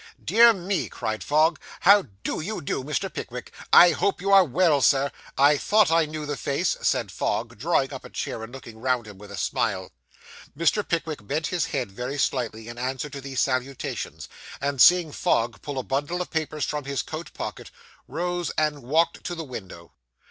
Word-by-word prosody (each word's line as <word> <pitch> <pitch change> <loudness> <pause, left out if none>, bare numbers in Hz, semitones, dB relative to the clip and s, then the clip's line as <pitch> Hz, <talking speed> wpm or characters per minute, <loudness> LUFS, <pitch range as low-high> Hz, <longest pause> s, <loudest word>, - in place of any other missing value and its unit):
'Dear 235 +1 +7
me,' 185 - -2
cried 110 0 -4
Fogg, 155 +1 +3 0.2
'how 200 +2 +6 0.2
do - - -2
you 210 +7 -4
do, 135 - -3
Mr. 145 +1 -2
Pickwick? - - -7 0.2
I 175 0 +9
hope 195 +4 0
you 195 +2 -1
are 195 -1 +8
well, 160 -1 +2
Sir. 140 +1 +3 0.3
I 145 +2 +5
thought 210 +1 +3
I 165 -1 +3
knew 155 0 -5
the 145 0 -3
face,' - - 0
said - - 0
Fogg, 115 -1 -2
drawing 140 -1 +1
up 135 - -7
a - - -10
chair, - - -4
and 110 +1 -8
looking 115 -4 -11
round 125 -1 0
him 105 -3 -12
with 105 0 -12
a 100 - -8
smile. - - -1 0.7
Mr. 170 +6 +2
Pickwick 160 -10 -3
bent 155 +2 -1
his 175 -3 +1
head 125 -7 -3
very 125 +7 -5
slightly, 115 -5 -1
in 120 +1 -8
answer 130 +3 -3
to 140 -1 -7
these 135 -1 -2
salutations, 130 0 -3 0.3
and, 140 -2 -1
seeing 175 -3 +6
Fogg 120 -9 0
pull 145 -2 -6
a 130 - -1
bundle 145 +8 -2
of 180 - -4
papers 155 -3 -2
from 150 -2 -3
his 140 -1 -2
coat 160 +2 -7
pocket, - - -6 0.4
rose 175 0 -2
and 150 -2 +1
walked 160 +7 +1
to 175 - -3
the 165 - -5
window. 95 - -9
145 Hz, 190 wpm, -25 LUFS, 130-170 Hz, 0.7 s, I